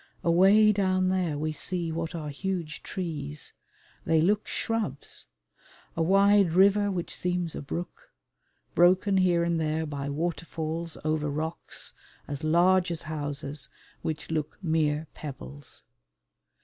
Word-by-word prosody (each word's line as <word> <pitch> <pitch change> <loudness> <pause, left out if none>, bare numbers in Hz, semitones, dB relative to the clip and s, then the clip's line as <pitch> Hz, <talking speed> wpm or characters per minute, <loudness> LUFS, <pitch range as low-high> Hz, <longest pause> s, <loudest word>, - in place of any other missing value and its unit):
Away 195 +5 +6
down 185 -2 +2
there 180 -5 0
we 155 +1 -1
see 170 +2 -1
what 165 +1 -3
are 155 -3 -4
huge 170 0 -3
trees: 150 -5 -5 0.5
they 160 0 +3
look 205 +6 +2
shrubs; 215 - -2 0.7
a 165 - -1
wide 195 0 +5
river 200 +3 +5
which 180 -3 -3
seems 180 -2 -1
a - - -5
brook, 170 +5 -6 0.6
broken 185 +3 +4
here 175 -2 +3
and 170 -1 0
there 160 +1 0
by 140 -2 -4
waterfalls 165 +1 -3
over 155 -1 0
rocks, 160 +3 -3 0.3
as 145 +1 -5
large 175 +3 +4
as 170 -1 -3
houses, 145 -3 -4 0.3
which 155 0 -4
look 155 -2 -2
mere 155 -2 +1
pebbles. 70 - -9
165 Hz, 125 wpm, -28 LUFS, 155-185 Hz, 0.7 s, Away